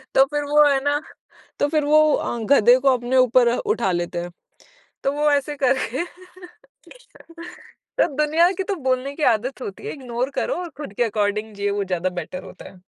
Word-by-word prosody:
तो 270 - +6
फिर 295 0 -1
वो 295 +1 +5
है 275 -1 +2
ना, 290 +1 +1 0.6
तो 285 - +2
फिर 300 -1 0
वो 305 +1 +5 0.2
अ, 240 - -3
गधे 245 -2 +6
को 270 +1 +3
अपने 245 +2 -1
ऊपर 250 -1 +4
उठा 195 -6 -1
लेते 175 0 -2
हैं। 175 0 -7 0.7
तो 275 - +1
वो 295 +1 +1
ऐसे 285 +1 0
करके 260 +3 +1 2.0
तो - - +4
दुनिया 315 +4 +3
की 385 - -3
तो - - +1
बोलने 255 +2 -1
की 315 - -5
आदत 255 +5 -5
होती 195 - -7
है, - - -4
इग्नोर 255 -2 -4
करो - - -1
और 345 - -7
खुद 285 -9 -8
के 240 - +1
अकॉर्डिंग 210 0 -2
जियो 200 0 -2
वो 200 - -1
ज़्यादा 180 -1 -1
बेटर 185 +3 -8
होता - - -12
है। 185 - -18
255 Hz, 190 wpm, -22 LUFS, 210-290 Hz, 2.0 s, तो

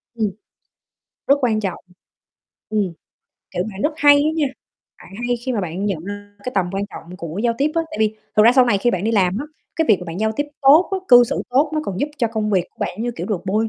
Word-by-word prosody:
Ừm. 215 -3 0 1.0
Rất 280 - +6
quan 225 -4 +1
trọng. 195 -4 -3 0.9
Ừm, 205 -5 0 0.6
kiểu, 180 - -1
bạn 195 0 -7
rất 305 - +1
hay 290 0 +7
á 290 +2 +2
nha, 300 -3 +2 0.5
bạn - - -15 0.2
hay 245 - +1
khi 255 - 0
mà 225 - 0
bạn 180 +2 -4
nhận 180 -5 -2
ra 205 0 -8
cái 250 - -3
tầm 190 -3 +2
quan 195 +1 -1
trọng 180 +2 -10
của 170 -1 -6
giao 235 -1 +2
tiếp 290 +2 +2
á, 330 - +2
tại - - -6
vì 215 0 +1 0.2
thực 210 - +7
ra 235 - +7
sau 255 -1 +6
này 210 -5 +2
khi 240 +4 +2
bạn 185 -2 -2
đi 225 - +1
làm 190 -1 +2
á, 280 - -4 0.3
cái 325 - +2
việc 215 - +6
mà - - -6
bạn 170 +2 -6
giao 220 0 +1
tiếp 290 - 0 0.2
tốt 290 +6 +6
á, 385 - +1
cư 245 -1 +9
xử - - -2
tốt 280 +4 +3
nó 310 - +1
còn 190 -1 -4
giúp 290 - +1
cho 235 - +2
công 215 -1 -2
việc 185 -4 +2
của - - -43
bạn 215 +5 -3
như 240 - -1
kiểu - - -4
được 200 -6 -2
bôi 215 +3 +1
215 Hz, 265 wpm, -20 LUFS, 195-250 Hz, 1.0 s, cư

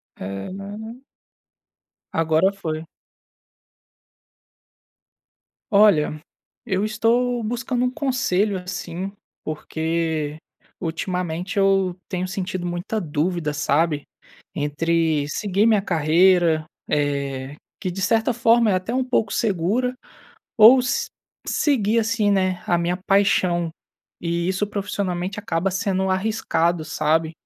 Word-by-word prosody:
É, 95 - -6
né. 210 +4 -7 1.1
Agora 160 +4 +2
foi. 160 -4 -5 2.9
Olha, 200 -8 +4 0.5
eu 195 -2 0
estou 235 +2 +1
buscando 245 +2 -1
um 250 - +1
conselho 230 -8 0
assim, 180 0 -5 0.3
porque 160 -1 -2 0.4
ultimamente 180 +2 -3
eu 195 -2 +3
tenho 185 -1 -2
sentido 185 -1 -4
muita 175 +5 -3
dúvida, 155 0 -1
sabe, 145 +1 +1 0.5
entre 155 0 0
seguir 200 +6 0
minha 220 -3 +4
carreira, 170 -1 +3 0.2
eh, 140 -2 -1 0.3
que 185 - -2
de 195 +2 -5
certa 225 +5 +2
forma, 230 -1 +4
é - - +3
até 185 +6 -2
um 260 - +2
pouco 240 -5 0
segura 220 +5 0 0.7
ou 240 +4 +9
se 250 - 0 0.4
seguir 230 -7 +2
assim, 220 -2 +1
né, 185 -2 0
a 175 - +3
minha 175 +1 -1
paixão, 180 -4 +2 0.5
e 170 +1 -1
isso 190 +2 0
profissionalmente 195 -2 -3
acaba 190 -2 -1
sendo 190 0 0
arriscado, 185 -4 0
sabe, 155 +1 0
185 Hz, 105 wpm, -22 LUFS, 165-210 Hz, 2.9 s, ou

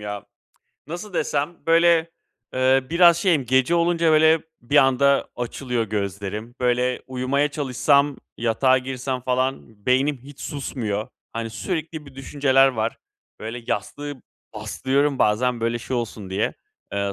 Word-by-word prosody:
ya. 105 -1 -6 0.6
Nasıl 175 +6 -7
desem? 150 +1 -1
Böyle, 165 0 +4 0.4
eee, 130 +1 +3
biraz 170 0 +6
şeyim, 165 -9 +2
gece 130 +6 +3
olunca 170 -1 +2
böyle 160 +1 +5 0.2
bir 130 +5 -1
anda 140 +1 +4
açılıyor 125 -1 -2
gözlerim. 105 +2 -4
Böyle, 125 0 +1
uyumaya 130 +3 0
çalışsam, 140 0 +2 0.2
yatağa 120 +3 +3
girsem 130 0 -4
falan 125 -4 -2
beynim 135 +3 +2
hiç 140 +1 -13
susmuyor. 110 -7 -3 0.2
Hani 115 0 -4
sürekli 155 - -4
bir 140 - -14
düşünceler 135 0 +3
var. 115 -3 -2 0.4
Böyle 115 +2 -6
yastığı 145 +6 -4 0.3
bastırıyorum 135 +6 0
bazen, 120 +3 +2
böyle, 115 +1 0
şey 125 +2 -4
olsun 110 -4 -5
diye, 95 +3 -1 0.4
eee, 100 0 -1
130 Hz, 130 wpm, -23 LUFS, 115-145 Hz, 0.6 s, biraz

